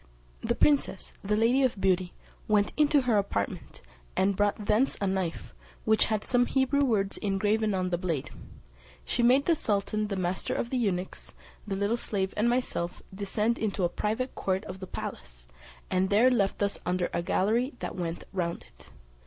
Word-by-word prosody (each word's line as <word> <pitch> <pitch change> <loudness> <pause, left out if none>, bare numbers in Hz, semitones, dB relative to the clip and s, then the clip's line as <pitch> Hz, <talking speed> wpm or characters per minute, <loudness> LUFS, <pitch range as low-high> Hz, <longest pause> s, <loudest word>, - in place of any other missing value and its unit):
The - - 0
princess, 285 -9 +1
the 210 +1 +1
Lady 235 +5 +3
of 255 -6 +1
Beauty, 185 -1 +1 0.3
went 210 -1 +2
into 295 -1 +4
her 235 -5 +3
apartment, 100 - -3 0.3
and 195 +1 +3
brought 205 +1 0
thence 220 +6 +2
a 200 - 0
knife, 175 - -2 0.3
which 220 0 +4
had 215 -2 -1
some 245 -1 +3
Hebrew 270 +1 +2
words 205 -7 +1
engraven 210 +1 +1
on 185 -1 -1
the 175 - 0
blade: 165 -7 -2 0.7
she 240 - 0
made 255 +4 +5
the 340 - +4
sultan, 215 -5 -1
the 200 - -3
master 185 -1 -1
of 235 - -2
the 260 - 0
eunuchs, 190 -6 -2 0.3
the 195 - -2
little 200 +4 0
slave, 195 -4 -2
and 220 +3 +2
myself, 240 -8 -2
descend 210 +4 -1
into 200 -3 -1
a 175 - +3
private 220 +8 -2
court 190 +1 -1
of 185 +1 -7
the 185 - -7
palace, - - -7 0.4
and 185 +1 +2
there 230 +6 +5
left 205 -4 +1
us 200 - -1
under 180 0 0
a - - 0
gallery 230 - +1
that - - -5
went 170 -2 -4
round 170 -3 -2
it. - - -18
205 Hz, 180 wpm, -28 LUFS, 185-235 Hz, 0.7 s, made